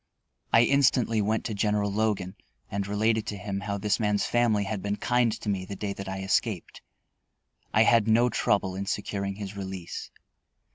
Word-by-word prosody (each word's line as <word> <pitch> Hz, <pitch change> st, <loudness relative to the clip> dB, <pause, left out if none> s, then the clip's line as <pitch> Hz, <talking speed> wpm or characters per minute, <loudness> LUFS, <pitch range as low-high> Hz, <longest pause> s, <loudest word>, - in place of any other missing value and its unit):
I 115 Hz, -, +6 dB
instantly 125 Hz, -4 st, +3 dB
went 110 Hz, +2 st, 0 dB
to 110 Hz, -, -2 dB
General 105 Hz, 0 st, 0 dB
Logan, 100 Hz, -3 st, -1 dB, 0.4 s
and 100 Hz, 0 st, -2 dB
related 110 Hz, +2 st, +1 dB
to 105 Hz, -, -3 dB
him 100 Hz, +1 st, -4 dB
how 100 Hz, 0 st, -3 dB
this 105 Hz, +2 st, 0 dB
man's 105 Hz, -2 st, +1 dB
family 115 Hz, -4 st, +2 dB
had 100 Hz, 0 st, -3 dB
been 100 Hz, +1 st, -1 dB
kind 120 Hz, +2 st, +2 dB
to 115 Hz, 0 st, -8 dB
me 100 Hz, -2 st, 0 dB
the 100 Hz, +2 st, -7 dB
day 100 Hz, +1 st, -3 dB
that 100 Hz, -1 st, -7 dB
I 95 Hz, 0 st, -4 dB
escaped. 95 Hz, -1 st, -1 dB, 0.9 s
I -, -, +5 dB
had 115 Hz, -2 st, +4 dB
no 115 Hz, +2 st, +4 dB
trouble 100 Hz, -5 st, +1 dB
in 100 Hz, +1 st, -4 dB
securing 100 Hz, -1 st, -2 dB
his 100 Hz, -1 st, -7 dB
release. 95 Hz, -3 st, -6 dB
105 Hz, 180 wpm, -27 LUFS, 100-110 Hz, 0.9 s, I